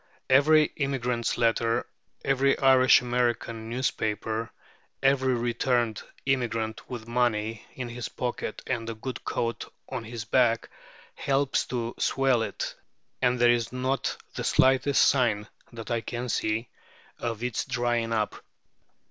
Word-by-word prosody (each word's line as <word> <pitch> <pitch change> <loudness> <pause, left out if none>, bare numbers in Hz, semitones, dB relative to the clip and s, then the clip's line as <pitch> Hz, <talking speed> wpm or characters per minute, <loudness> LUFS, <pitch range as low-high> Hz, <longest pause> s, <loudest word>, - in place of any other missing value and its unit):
Every 150 +3 +5
emigrant's 125 -4 -1
letter, 115 -1 +2 0.4
every 135 0 +3
Irish 130 -2 +6
American 120 -2 -1
newspaper, 110 -2 -2 0.5
every 130 -1 +3
returned 120 -2 0 0.2
emigrant 115 -4 -1
with 120 -3 -6
money 115 -2 0
in 125 -2 -4
his 120 0 -5
pocket 120 -3 -4
and 115 -3 -2
a 115 - -4
good 125 +4 -6
coat 115 0 -3 0.2
on - - -4
his 115 -1 -6
back, 115 -1 +2 0.4
helps 140 0 0
to 120 -2 -3
swell 135 -3 +2
it, - - -3 0.5
and 125 -1 +3
there 120 0 +5
is 115 -1 0
not 130 +2 -1 0.2
the - - -4
slightest 135 +1 +4
sign, 115 -6 +2 0.2
that 115 0 -8
I 115 -1 +1
can 120 +2 -4
see, 110 +1 -1 0.5
of 115 -1 -3
its 125 -2 -1
drying 120 -1 0
up. 110 -2 -1
120 Hz, 130 wpm, -27 LUFS, 115-130 Hz, 0.5 s, Irish